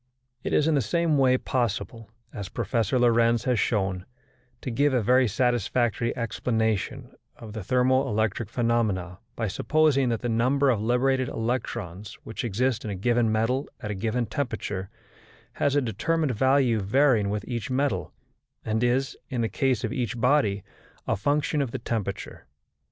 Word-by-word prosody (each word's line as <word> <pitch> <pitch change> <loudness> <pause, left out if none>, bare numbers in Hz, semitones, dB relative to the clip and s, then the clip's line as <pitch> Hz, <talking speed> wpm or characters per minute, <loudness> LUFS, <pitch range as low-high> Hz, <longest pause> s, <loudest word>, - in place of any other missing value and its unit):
It - - -4
is 150 - +3
in 160 - +3
the 140 - +3
same 155 +6 +1
way 130 -1 +4
possible, 120 -3 -2 0.2
as 100 -3 -6
Professor 115 +3 0
Lorentz 115 -1 +3
has 125 -4 +1
shown, 95 -4 -1 0.5
to 130 - -4
give 140 +3 +2
a 125 - +3
very 125 +3 +4
satisfactory 120 0 0
explanation 110 -2 -1 0.2
of 110 -2 -10
the 110 -3 -5
thermo 130 +4 +2
electric 110 -1 -1
phenomena 110 -7 0 0.2
by 115 - -2
supposing 140 +5 +2
that 115 -2 -1
the 120 - -2
number 130 +4 +2
of 110 -4 0
liberated 125 +3 +1
electrons 110 -5 -4
which 110 - -6
exist 120 +2 0
in 110 - -4
a 100 - -3
given 120 +3 +1
metal 115 +5 0
at 105 - -5
a - - -1
given 115 +5 -1
temperature 105 -5 -3 0.6
has 140 0 0
a 145 - +4
determined 140 +6 0
value 130 -1 +3
varying 110 0 +3
with 105 +1 -3
each 120 +1 -4
metal, 135 +2 -1 0.5
and 110 +1 0
is, 125 +2 +1
in 125 -4 -2
the 115 - 0
case 130 -4 0
of 115 0 -2
each 120 -4 -2
body, 120 -7 +2 0.4
a - - +1
function 145 +6 0
of 135 - -1
the - - -4
temperature. 100 -4 -4
120 Hz, 160 wpm, -26 LUFS, 110-130 Hz, 0.6 s, way